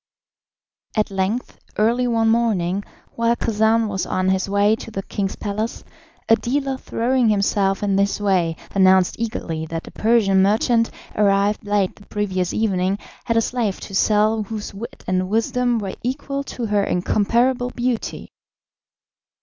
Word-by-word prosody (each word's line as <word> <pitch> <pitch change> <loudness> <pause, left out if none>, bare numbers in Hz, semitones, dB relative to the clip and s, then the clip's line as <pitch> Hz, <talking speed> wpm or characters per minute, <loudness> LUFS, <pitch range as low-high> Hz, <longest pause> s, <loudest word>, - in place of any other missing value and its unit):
At 210 -1 +1
length, 195 +5 -2 0.2
early 235 +4 +2
one 225 -1 +2
morning, 205 -5 +1 0.3
while 230 0 +2
Khacan 220 0 +2
was 195 -2 -2
on 185 0 0
his 190 +1 0
way 205 +2 +3
to - - -9
the 195 -3 -5
king's 195 -1 -3
palace, 215 +2 -4 0.4
a 225 - +6
dealer, 270 +3 -1
throwing 245 0 +1
himself 200 -1 +1
in 200 -1 +1
his 200 +1 +1
way, 185 -5 +1 0.2
announced 190 -1 +4
eagerly 165 -8 -3
that 165 +1 -5
a - - -10
Persian 215 -4 +3
merchant, 225 +3 +3 0.3
arrived 205 +1 +2
late 205 -2 0
the 205 - -17
previous 185 -4 -1
evening, 195 -3 0 0.3
had 230 - +1
a - - +5
slave 225 -4 -1
to 195 - -9
sell 215 +2 +3
whose 210 0 -6
wit 235 +7 -9
and 185 0 0
wisdom 245 +2 +1
were 195 -3 -4
equal 275 +2 -3
to 245 - -5
her 205 -2 +1
incomparable 235 +8 +1
beauty. 245 -2 -3
210 Hz, 150 wpm, -21 LUFS, 195-230 Hz, 0.4 s, a